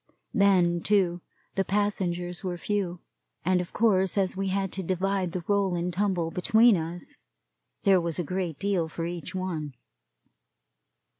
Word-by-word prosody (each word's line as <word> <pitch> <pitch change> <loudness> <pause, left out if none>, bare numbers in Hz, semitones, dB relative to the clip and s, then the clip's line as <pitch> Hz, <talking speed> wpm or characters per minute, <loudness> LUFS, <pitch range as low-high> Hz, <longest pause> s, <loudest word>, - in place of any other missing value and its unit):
Then, 180 -4 +4
too, 180 -4 +2 0.3
the 195 - +1
passengers 180 -3 -1
were 180 -2 -3
few; 180 -2 -2 0.4
and 185 0 +3
of 175 - -7
course 190 -4 +2
as 190 -2 +2
we 195 +1 -2
had 195 0 -1
to 190 - -3
divide 185 0 -1
the 180 -1 -4
roll 200 -3 +2
and 175 +1 -2
tumble 180 -4 0
between 220 +6 +5
us, 170 +1 -4 0.7
there 190 -2 +5
was 170 -2 -1
a 175 - 0
great 180 -2 -3
deal 195 -5 0
for 165 +1 -4
each 175 +2 -5
one. 160 -7 -3
185 Hz, 150 wpm, -27 LUFS, 175-195 Hz, 0.7 s, between